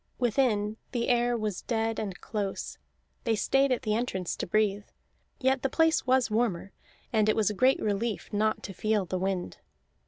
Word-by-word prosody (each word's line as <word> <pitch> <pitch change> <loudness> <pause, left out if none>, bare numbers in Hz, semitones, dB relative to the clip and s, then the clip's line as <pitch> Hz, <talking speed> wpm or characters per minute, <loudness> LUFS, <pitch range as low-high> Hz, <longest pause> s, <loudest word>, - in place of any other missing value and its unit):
Within, 220 -4 +1 0.2
the 235 -2 0
air 240 0 +2
was 215 -4 -3
dead 225 -1 -1
and 200 -4 -4
close; 205 -3 -4 0.4
they 230 -3 +1
stayed 270 +5 +2
at 255 - 0
the 215 -3 0
entrance 200 -6 -2
to - - -3
breathe, 205 +1 +1 0.5
yet 265 0 +2
the 270 - 0
place 320 0 +2
was 255 -3 +3
warmer, 210 -5 0 0.4
and 215 -1 +3
it - - +3
was 215 -2 +2
a - - -3
great 255 +6 +3
relief 210 +1 -1
not 215 +1 +1
to 195 - -6
feel 215 +1 0
the 185 +1 -3
wind. 190 -1 -2
220 Hz, 180 wpm, -28 LUFS, 205-245 Hz, 0.5 s, was